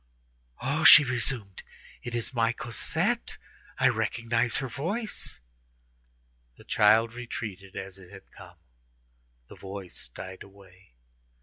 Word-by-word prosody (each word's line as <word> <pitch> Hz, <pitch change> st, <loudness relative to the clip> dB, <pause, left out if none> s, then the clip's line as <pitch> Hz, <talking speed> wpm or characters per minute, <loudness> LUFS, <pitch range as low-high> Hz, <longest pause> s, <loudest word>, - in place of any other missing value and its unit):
"Oh!" 140 Hz, +5 st, 0 dB
she 155 Hz, -, +11 dB
resumed, 120 Hz, -6 st, -2 dB, 0.4 s
"it 120 Hz, 0 st, -5 dB
is 120 Hz, +2 st, -3 dB
my 115 Hz, -1 st, +2 dB
Cosette! 120 Hz, -1 st, -2 dB, 0.4 s
I -, -, +4 dB
recognize 115 Hz, 0 st, 0 dB
her 135 Hz, -, -2 dB
voice." 195 Hz, -, -4 dB, 1.2 s
The -, -, -15 dB
child 110 Hz, +2 st, +4 dB
retreated 105 Hz, -6 st, -7 dB
as 95 Hz, 0 st, -7 dB
it 90 Hz, -2 st, -15 dB
had 95 Hz, 0 st, -14 dB
come; 90 Hz, -3 st, -14 dB, 0.9 s
the -, -, -12 dB
voice 95 Hz, -5 st, -8 dB
died 95 Hz, +9 st, -9 dB
away. 95 Hz, -5 st, -17 dB
115 Hz, 115 wpm, -28 LUFS, 95-120 Hz, 1.2 s, she